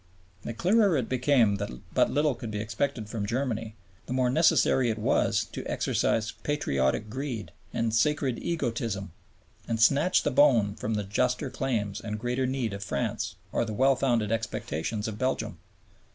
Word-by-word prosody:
The 115 - -6
clearer 195 - +3
it 125 -4 -1
became 125 -5 +3
that 100 +1 -3 0.2
but - - +3
little 150 +1 +2
could 120 -2 -7
be 105 -1 -3
expected 110 +2 -2
from 105 -2 -3
Germany, 115 -2 -2 0.3
the - - -3
more 130 -1 +2
necessary 130 -4 +4
it 110 - -1
was 105 - +1
to - - -5
exercise 110 -1 0
patriotic 70 - 0
greed 125 -2 -5 0.2
and 115 -1 -1
"sacred 135 0 +1
egotism" 115 - -2 0.6
and 115 -1 -1
snatch 140 - +4
the 145 - +1
bone 120 -7 +4
from 110 +1 -3
the 105 - -1
juster 125 +7 0
claims 110 -7 -2
and 105 -1 -4
greater 125 +3 -1
need 125 -5 -2
of 100 0 -5
France 70 -7 -2 0.2
or - - +1
the 110 -2 -4
well 135 +4 +4
founded 120 -5 +1
expectations 105 -2 -2
of 110 -1 -6
Belgium. 130 +1 -1
115 Hz, 165 wpm, -28 LUFS, 105-135 Hz, 0.6 s, necessary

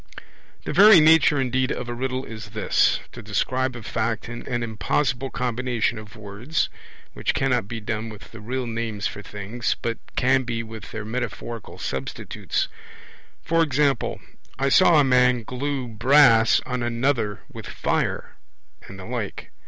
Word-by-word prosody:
The - - -4
very 210 -2 +9
nature 155 -2 +5
indeed 130 0 0
of 125 - -4
a 120 - -3
riddle 130 +1 -3
is 110 -2 -9
this, - - +2
to - - -9
describe 130 +5 -1
a 120 - -8
fact 115 +1 -2
in 120 0 -7
an 120 -2 -1
impossible 130 +4 -1
combination 120 -2 -1
of 110 +1 -12
words 110 +9 -2 0.4
(which - - -1
cannot 125 -6 +1
be 115 +1 -5
done 110 +1 -4
with 105 -2 -12
the 115 - -10
real 125 +4 -3
names 115 -3 -3
for 105 - -3
things, 105 +4 -3
but 115 0 -3 0.2
can 130 +1 +3
be 120 -2 -3
with 110 -2 -9
their 110 -1 -5
metaphorical 115 -1 -5
substitutes); 65 0 -3 0.8
e.g. 150 -4 +3 0.7
'I 135 +1 +1
saw 170 +1 +6
a - - +5
man 125 -2 +3
glue 130 +2 -3
brass 115 0 +5
on 125 -1 -3
another 120 -3 0
with - - -8
fire', - - -2 0.5
and 95 - -10
the 95 - -9
like. 115 -4 -5
120 Hz, 150 wpm, -24 LUFS, 110-130 Hz, 0.8 s, very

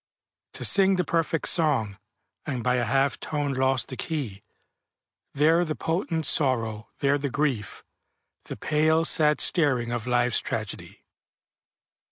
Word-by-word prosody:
To - - -4
sing 195 -1 +5
the 180 - 0
perfect 165 -1 -1
song, 125 - +1 0.5
And 130 -5 -3
by 125 0 +1
a 120 - 0
half 135 +4 0
tone 145 -2 -3
lost 130 0 0
the 130 - -5
key, 130 - -4 0.9
There 160 +4 +3
the 155 -3 -3
potent 165 -1 -2
sorrow, 115 -7 0
there 140 0 +2
the 140 0 -3
grief, 130 -7 -2 0.6
The - - -7
pale, 160 +1 +1
sad 150 -2 +2
staring 130 -8 +2
of 120 0 -4
Life's 125 -1 +2
Tragedy. - - -6
140 Hz, 135 wpm, -25 LUFS, 125-160 Hz, 0.9 s, sing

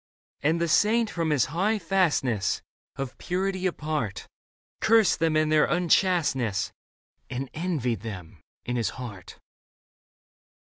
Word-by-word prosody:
And 155 +5 +2
the 170 - +1
saint 215 +7 +3
from 165 -2 -1
his 145 -6 +3
high 205 +6 +1
fastness 165 - +1 0.3
Of 135 -1 -6
purity 190 +1 -1
apart 150 - -3 0.5
Cursed 225 -5 +4
them 160 -1 +2
and 155 0 +2
their 155 -1 +5
unchasteness. 170 - +1 0.6
And 130 +1 -4
envied 155 - -1
them 95 -7 -8 0.2
in 125 0 -2
his 115 - 0
heart. 105 -8 -8
155 Hz, 120 wpm, -26 LUFS, 125-180 Hz, 0.6 s, their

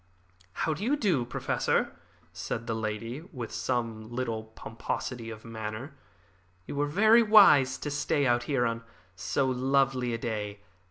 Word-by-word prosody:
"How 160 - 0
do 155 - -6
you 265 +6 +2
do, 185 - +1
Professor?" 120 - -1 0.4
said 115 - -4
the 115 - -2
lady, 110 +4 -4
with 120 -6 -6
some 115 -3 -2
little 120 -3 -3
pomposity 115 +1 -5
of 110 -1 -9
manner. 110 +4 -6 0.7
"You - - -6
were 145 +1 +1
very 215 +9 +5
wise 175 - +6
to 145 - -5
stay 145 0 0
out 120 -1 +3
here 130 -4 +1
on 115 0 -1 0.3
so 135 +8 0
lovely 130 -1 +1
a 115 - -1
day. 105 -3 -4
125 Hz, 150 wpm, -29 LUFS, 115-145 Hz, 0.7 s, wise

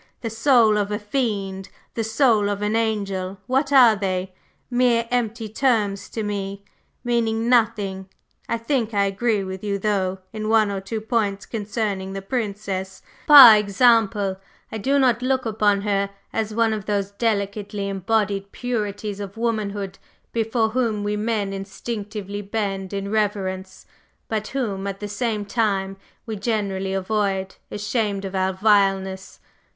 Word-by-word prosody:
The 230 - -3
soul 225 -3 +4
of 205 -1 -1
a 210 - -1
fiend, 205 -4 -2 0.2
the 225 - -2
soul 220 -2 +3
of 205 0 -2
an 210 +1 0
angel, 200 -4 -1
what 270 +3 0
are 250 -5 +7
they? 190 -2 -2 0.3
Mere 245 -2 +2
empty 230 -2 -1
terms 210 -4 0
to 220 - -4
me, 200 -1 -4 0.4
meaning 230 -2 0
nothing. 210 -6 +1 0.4
I 230 - +1
think 230 -2 -1
I 200 0 +3
agree 205 +1 0
with 190 0 -6
you 200 -1 -1
though, 190 -2 0 0.2
in 215 0 -3
one 220 -2 +4
or 195 -1 -3
two 215 +3 -4
points 210 -3 -1
concerning 205 -3 -3
the 195 - -4
Princess; 200 -4 -4 0.2
par 275 -7 +11
exemple, 210 -2 +3 0.3
I 220 - -4
do 275 +7 +1
not 250 -4 +3
look 260 0 0
upon 210 -2 +2
her 200 -1 0 0.2
as 220 -1 -1
one 225 0 +2
of 210 -3 -5
those 200 -1 -1
delicately 200 -1 -2
embodied 200 0 -1
purities 210 -4 -3
of 200 +1 -7
womanhood 205 -4 -2 0.3
before 225 0 +1
whom 220 -3 0
we 205 0 -1
men 210 -2 -1
instinctively 205 +1 -5
bend 195 -2 -3
in 200 0 -4
reverence, 190 -3 -2 0.4
but 215 -1 -2
whom, 205 -8 -3
at 195 0 -5
the 205 - -4
same 210 0 -2
time, 200 -3 0 0.3
we 225 -2 -4
generally 195 -3 -1
avoid, 195 -1 -1 0.2
ashamed 205 -1 -2
of 190 - -6
our 190 0 +1
vileness. 195 -1 +1
210 Hz, 145 wpm, -23 LUFS, 195-225 Hz, 0.4 s, par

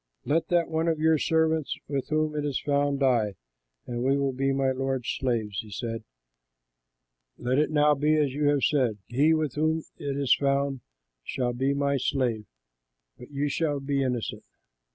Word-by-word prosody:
Let 160 +3 +1
that 175 -2 +2
one 160 +1 -1
of 165 -1 +1
your 160 0 +3
servants 160 -1 +1
with 140 -2 -3
whom 155 0 0
it 150 - -1
is 145 -3 -1
found 140 -1 0
die, 115 -7 +2 0.5
and 120 -1 -4
we 135 +2 +3
will 140 -1 +1
be 135 +1 0
my 135 -1 +1
lord's 130 -1 -2
slaves." 115 -7 -1
He 110 - -6
said, 115 +2 -4 1.3
"Let 125 +3 0
it 150 - +2
now 150 -1 +4
be 150 +2 +2
as 145 -4 +1
you 145 +1 -1
have 145 -1 +2
said: 125 -8 +2
he 145 +8 +3
with 155 -4 -1
whom 155 +2 0
it 140 -1 -3
is 140 -3 +3
found 140 -1 0 0.4
shall 125 - -2
be 135 +3 0
my 140 0 +1
slave; 125 -5 -1 0.7
but 125 - -11
you 145 0 -1
shall 145 0 0
be 140 0 -1
innocent." 125 -4 -2
140 Hz, 175 wpm, -27 LUFS, 130-150 Hz, 1.3 s, now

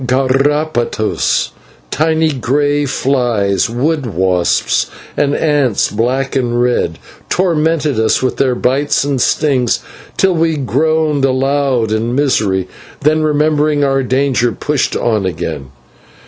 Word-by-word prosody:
/Garrapatas/, 135 -2 0 0.4
tiny 160 +1 +1
grey 145 +2 0
flies, 120 -7 0
wood 140 +4 -1
wasps, 90 -3 +1 0.3
and 145 0 +1
ants 145 -8 +1
black 125 +6 -1
and 120 -2 0
red, 120 -9 0 0.3
tormented 160 -6 +1
us 110 - +2
with 130 - -1
their 130 -2 +1
bites 135 +4 +1
and 140 -3 -1
stings 130 -5 +1 0.4
till 190 -1 +3
we 165 -1 +1
groaned 150 +2 0
aloud 135 -3 +1
in 115 +3 -1
misery, 105 -10 +1 0.3
then, 155 +2 +2
remembering 150 -1 +1
our 135 -1 +1
danger, 130 -1 +1
pushed 150 +2 -1
on 110 -4 0
again. 80 -6 -4
135 Hz, 115 wpm, -15 LUFS, 120-150 Hz, 0.4 s, till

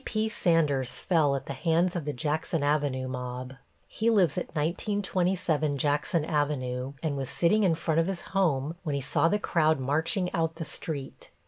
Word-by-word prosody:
T.P. 220 -2 -1
Sanders 150 - +1
fell 155 -6 +2
at 135 - -4
the 140 - -4
hands 170 +6 +1
of 170 -5 -3
the 150 - -1
Jackson 150 +3 -1
Avenue 145 -3 0
mob. 125 0 -5 0.3
He 225 +1 0
lives 190 -10 +3
at - - -2
1927 175 -2 0
Jackson 150 +3 +1
Avenue, 140 -4 -1
and 155 -3 0
was 135 -2 -3
sitting 175 +6 +2
in 175 -4 +3
front 160 0 0
of 165 - +2
his 190 -3 -2
home 160 -5 +1
when 150 -5 -2
he 140 - -1
saw 150 +4 +2
the 205 - +2
crowd 160 -7 +2
marching 160 +7 0
out 165 -1 0
the 165 -1 -5
street. 145 -3 -6
155 Hz, 180 wpm, -28 LUFS, 140-175 Hz, 0.3 s, lives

